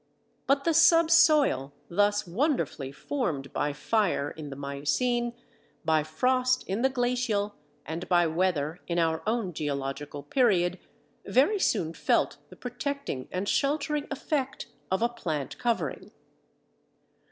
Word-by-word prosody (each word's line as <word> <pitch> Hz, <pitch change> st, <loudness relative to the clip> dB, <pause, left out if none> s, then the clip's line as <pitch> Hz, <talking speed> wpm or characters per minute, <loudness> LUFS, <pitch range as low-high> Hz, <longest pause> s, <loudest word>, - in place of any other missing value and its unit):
But 275 Hz, 0 st, +3 dB
the 335 Hz, -, +2 dB
subsoil, 315 Hz, -, +5 dB
thus 205 Hz, +3 st, +2 dB
wonderfully 185 Hz, -, -1 dB
formed 150 Hz, -, -3 dB
by 145 Hz, 0 st, 0 dB
fire 170 Hz, -2 st, 0 dB
in 155 Hz, -2 st, -8 dB
the 135 Hz, -, -7 dB
miocene, 145 Hz, -, -1 dB, 0.5 s
by 160 Hz, -1 st, +3 dB
frost 255 Hz, +11 st, +1 dB
in 195 Hz, +4 st, -2 dB
the 265 Hz, -, +4 dB
glacial, 245 Hz, -5 st, 0 dB, 0.3 s
and 160 Hz, +4 st, -5 dB
by 175 Hz, -1 st, +4 dB
weather 165 Hz, -1 st, 0 dB
in 170 Hz, -, -1 dB
our 160 Hz, -1 st, +1 dB
own 220 Hz, -5 st, 0 dB
geological 145 Hz, 0 st, -4 dB
period, 190 Hz, -10 st, +2 dB, 0.5 s
very 365 Hz, +12 st, +3 dB
soon 175 Hz, -, +1 dB
felt -, -, +1 dB
the -, -, -13 dB
protecting 245 Hz, -, -4 dB
and 185 Hz, +2 st, -2 dB
sheltering 295 Hz, +2 st, 0 dB
effect 275 Hz, -1 st, -2 dB, 0.2 s
of 190 Hz, +4 st, +1 dB
a -, -, +5 dB
plant 155 Hz, -, -4 dB
covering. 235 Hz, -2 st, -1 dB
205 Hz, 125 wpm, -28 LUFS, 155-260 Hz, 0.5 s, subsoil